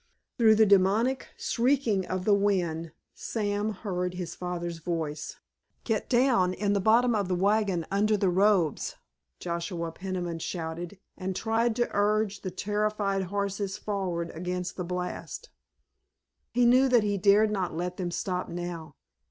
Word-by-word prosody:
Through 220 -2 +6
the 220 0 +6
demoniac 205 +6 +3
shrieking 235 -6 +1
of 185 0 -3
the 210 - +4
wind 175 -5 0 0.2
Sam 205 -1 -2
heard 180 -4 -3
his 180 -2 -5
father's 175 -2 -4
voice. 160 -3 -4 0.5
"Get 220 -3 -1
down 240 -8 +3
in 205 +1 0
the 200 - +2
bottom 230 +5 +4
of 205 -3 0
the 180 - 0
wagon 195 -2 +1
under 210 +2 +2
the 190 -2 +2
robes," 190 -4 +2 0.4
Joshua 170 -1 -3
Peniman 175 -2 -4
shouted, 170 +2 -5 0.2
and 185 0 -4
tried 225 +2 +1
to 240 +1 +1
urge 205 0 +1
the 190 - -3
terrified 205 0 -1
horses 200 +1 -2
forward 185 -5 -3
against 180 +2 -4
the 180 - -3
blast. 180 - -5 1.0
He 245 0 +3
knew 255 +2 +5
that 240 -3 +4
he 205 -1 0
dared 210 +2 +5
not 185 -6 -2
let 180 +1 -3
them 180 -2 -2
stop 180 +1 -3
now. 170 -3 -6
195 Hz, 145 wpm, -28 LUFS, 180-215 Hz, 1.0 s, Through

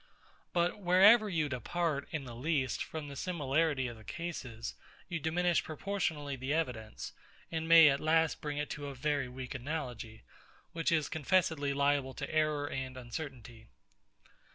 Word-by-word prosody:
But 175 +3 +1
wherever 205 +4 +6
you 160 -5 +1
depart, 140 +3 -2
in 155 -4 -4
the 120 -2 -8
least, 135 +1 0
from 155 -2 -6
the 140 - -8
similarity 150 -3 0
of 120 -2 -7
the 110 - -14
cases, 130 - -5 0.3
you 170 -3 -3
diminish 165 0 +1
proportionably 155 -4 -2
the 135 +3 -2
evidence; 120 -9 -3 0.4
and 160 -1 -2
may 165 -1 +9
at 140 -1 +3
last 160 0 +2
bring 145 -1 -3
it 150 0 -2
to 145 -1 -5
a 140 - -6
very 145 -1 0
weak 130 +1 -7
analogy, 125 -5 -5 0.5
which 165 0 0
is 155 -3 +2
confessedly 160 -2 +1
liable 140 -1 +1
to 140 - -4
error 155 -2 +1
and 130 -2 -4
uncertainty. 120 -2 -7
145 Hz, 155 wpm, -33 LUFS, 130-165 Hz, 0.5 s, may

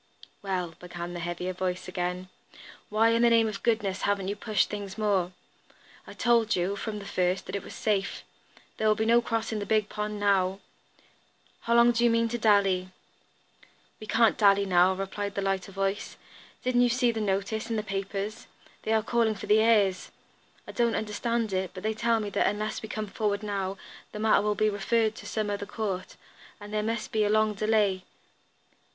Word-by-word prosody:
"Well," 185 -4 -3
began 175 0 -7
the 175 - -5
heavier 175 +2 -3
voice 185 0 -3
again, 180 0 -3 0.6
"why 220 +2 +3
in 230 0 +2
the 240 - +6
name 230 -1 +4
of 210 -2 -5
goodness 215 -5 0
haven't 200 -2 0
you 200 - -2
pushed 210 -1 +1
things 200 -1 -6
more? 200 -4 +1 0.8
I - - -9
told 235 -3 +2
you, 185 +3 0
from 215 +1 -4
the 200 - -8
first, 185 -1 0
that 185 - -5
all 200 - -2
was - - -10
safe. 205 -3 -1 0.5
There 220 - +1
will 215 - +4
be 220 - -1
no 235 +1 +5
crossing 225 -2 -2
the 205 - -4
big 215 -1 +1
pond 210 0 -4
now. 195 -2 +2 1.1
How 235 - +2
long 235 0 +6
do 235 0 0
you 240 - +5
mean 230 0 +2
to 240 +1 -3
dally?" 195 -4 +3 1.1
"We 215 - -9
can't 225 0 +3
dally 200 -1 +5
now," 180 0 +4
replied 195 +1 -4
the 200 - -1
lighter 195 -1 -1
voice. 195 +1 -2 0.5
"Didn't 250 -1 +2
you 245 - +4
see 245 0 +2
the 225 -1 -3
notice 200 +2 -1
in 230 - -1
the 215 - -1
papers? 195 +1 -4 0.3
They 220 - -1
are 220 -1 +2
calling 230 -2 +1
for - - -7
the 210 +1 +4
heirs. 210 -4 +3 0.6
I - - -6
don't 235 -1 +1
understand 220 0 -1
it, 185 0 -2
but 185 - -8
they 220 0 0
tell 230 +1 +1
me 210 -2 -4
that - - +2
unless 215 +1 -2
we 220 - -8
come 215 0 -3
forward 205 0 -2
now, 195 -2 -3 0.4
the 210 - -6
matter 220 -1 +4
will 210 0 0
be 215 - +2
referred 215 +2 +1
to - - -9
some 215 -2 -2
other 205 0 -4
court, 200 -4 -4 0.4
and 205 0 -10
then 215 0 0
there 230 - +1
must 215 - -7
be 215 -1 +2
a 205 - +1
long 215 0 +3
delay. 205 -3 +1
210 Hz, 200 wpm, -28 LUFS, 195-220 Hz, 1.1 s, the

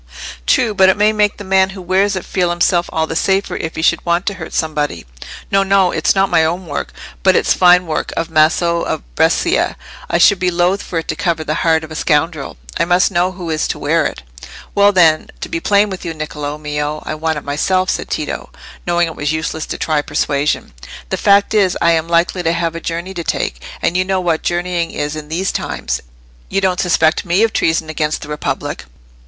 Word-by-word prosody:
"True: 220 - +3
but 190 -1 +5
it 190 - +2
may 210 +1 +3
make 210 -1 +1
the 205 - -8
man 190 0 +3
who 190 0 -9
wears 190 +3 +1
it 185 - -4
feel 180 -2 0
himself 175 0 +1
all 160 0 0
the 160 - -5
safer 195 +3 0
if 160 - -4
he 160 - -3
should - - +2
want 170 +1 0
to 200 - -1
hurt 180 -4 -8
somebody. 150 - -2 0.5
No, 195 0 +4
no; 195 -2 +3
it's 160 - +1
not 195 0 +3
my 160 - +3
own 175 +3 -1
work; 145 -3 -4 0.3
but - - +4
it's - - +3
fine 180 0 +5
work 160 -2 -3
of 165 0 -2
Maso 170 +2 +3
of - - -3
Brescia; - - +2 0.3
I - - +2
should 185 +2 +5
be 180 - +1
loth 180 +3 +1
for 175 - -5
it 165 - -3
to - - -1
cover 170 -5 -1
the 155 - -2
heart 160 -1 +2
of 155 - -10
a - - -6
scoundrel. 150 - 0 0.2
I - - +4
must 180 +3 +3
know 180 +1 +1
who 175 -3 -5
is 155 0 0
to - - -3
wear - - +1
it." - - -9 0.5
"Well, 200 0 +5
then, 165 -5 +3
to - - -5
be 165 - -3
plain 205 +3 +2
with 190 - -6
you, 165 -2 -5
Niccolò 150 -1 -5
mio, 150 0 -3
I - - -3
want 160 0 -2
it 150 - -6
myself," 185 +6 0
said - - -4
Tito, - - -4 0.4
knowing 175 0 +2
it 165 - -7
was 145 0 -1
useless 160 0 -3
to - - -4
try 155 -2 0
persuasion. 145 - -1 0.4
"The - - -1
fact 200 0 +3
is, 195 -4 +2
I 170 - +4
am 165 0 +1
likely 170 +2 +1
to 165 -1 +1
have 170 -1 -1
a 165 - -6
journey 170 +3 -4
to 175 -2 -4
take—and 110 - -3
you 185 - +3
know 190 0 0
what 170 -3 0
journeying 175 -1 -1
is 150 0 -3
in 150 -1 -8
these 180 +4 -1
times. - - -3 0.5
You - - 0
don't 185 -2 0
suspect 165 -2 +2
me 180 +4 +2
of 225 - +1
treason 160 0 +1
against 155 -1 -2
the 150 - -9
Republic?" 150 - -4
170 Hz, 225 wpm, -17 LUFS, 155-185 Hz, 0.5 s, but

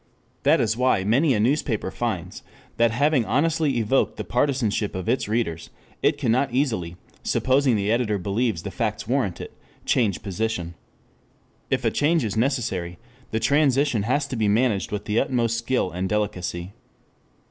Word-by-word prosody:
That - - +4
is 110 -1 +1
why 125 -5 +2
many 130 +7 +3
a - - 0
newspaper 115 -4 0
finds 95 -7 -4 0.4
that, 115 0 +4
having 140 +3 +2
honestly 145 +4 +1
evoked 115 +4 +1
the - - -3
partisanship 120 -6 0
of 95 +2 -4
its 125 0 0
readers, 105 -7 -2 0.3
it - - +2
can - - 0
not 130 +2 +1
easily, 110 - -1 0.2
supposing 130 -1 +2
the 100 0 0
editor 115 -3 +1
believes 100 -1 -1
the 100 - -5
facts 110 -2 -3
warrant 120 -8 0
it, - - -8 0.3
change 105 -7 +1
position. 95 -4 -3 1.0
If - - 0
a - - +3
change 160 +1 +2
is 105 -3 -2
necessary, 110 -8 -1 0.3
the 110 - -1
transition 140 -1 +2
has 130 +7 0
to - - -3
be 110 -3 +1
managed 105 -2 +1
with 105 0 -4
the 105 +1 +1
utmost 120 -3 0
skill 115 -4 -1
and 90 +2 -3
delicacy. 95 -3 -2
115 Hz, 160 wpm, -24 LUFS, 100-130 Hz, 1.0 s, That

